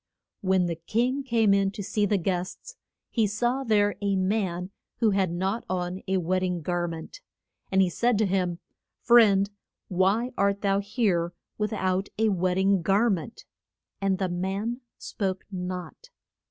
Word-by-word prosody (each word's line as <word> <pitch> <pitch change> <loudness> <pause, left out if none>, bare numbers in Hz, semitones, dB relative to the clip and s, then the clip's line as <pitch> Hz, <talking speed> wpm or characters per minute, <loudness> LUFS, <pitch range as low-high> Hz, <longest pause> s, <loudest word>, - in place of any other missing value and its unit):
] - - -60
When 185 -1 +4
the 170 -2 -2
king 240 - 0
came 230 -6 +3
in 195 0 +3
to 200 - -5
see 205 +1 0
the 205 - +2
guests, 185 - -3 0.4
he 225 -3 +2
saw 240 +6 0
there 205 -4 +3
a 200 -1 +1
man 185 -2 -1 0.3
who 225 -3 +3
had 190 -3 +1
not 190 +6 -1
on 180 0 -2
a 190 0 +1
wed 185 +1 +1
ding 180 -2 -1
gar 175 +1 -1
ment. 165 - -8 0.5
And 190 0 +5
he 185 - +1
said 235 +5 +2
to 215 - +3
him, 180 -3 0 0.5
Friend, 210 -5 +6 0.4
why 195 +7 +2
art 200 0 +2
thou 195 -1 +2
here 200 -5 0 0.3
with 210 +1 0
out 190 -1 0
a 220 0 +3
wed 185 -2 +1
ding 190 0 +3
gar 200 +6 +3
ment. 190 +4 -4 0.6
And 195 -1 +1
the 190 - 0
man 195 +7 -2 0.2
spoke 190 -2 -3
not. 180 - -6
195 Hz, 165 wpm, -27 LUFS, 185-215 Hz, 0.6 s, Friend